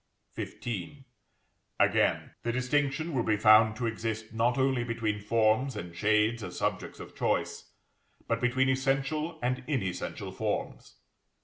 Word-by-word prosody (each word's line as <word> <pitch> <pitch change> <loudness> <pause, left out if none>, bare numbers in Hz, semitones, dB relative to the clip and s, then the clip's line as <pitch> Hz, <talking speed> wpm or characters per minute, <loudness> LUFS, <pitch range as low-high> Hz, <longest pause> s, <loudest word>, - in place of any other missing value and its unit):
XV. 120 +6 -5 0.8
Again, - - +2
the 120 - -1
distinction 140 +5 0
will 130 - +1
be 110 -2 +1
found 110 +1 +6
to 120 - -3
exist, 110 -1 -3
not 120 +2 +1
only 130 -2 +2
between 115 -3 -2
forms 110 +5 +2
and 85 -1 -7
shades 110 +5 +2
as 90 -4 -7
subjects - - -2
of - - -10
choice, - - -1 0.6
but 115 0 0
between 130 +1 +2
essential 135 +5 0
and 125 +1 -1
inessential 110 - -3
forms. - - -4
120 Hz, 130 wpm, -29 LUFS, 110-130 Hz, 0.8 s, found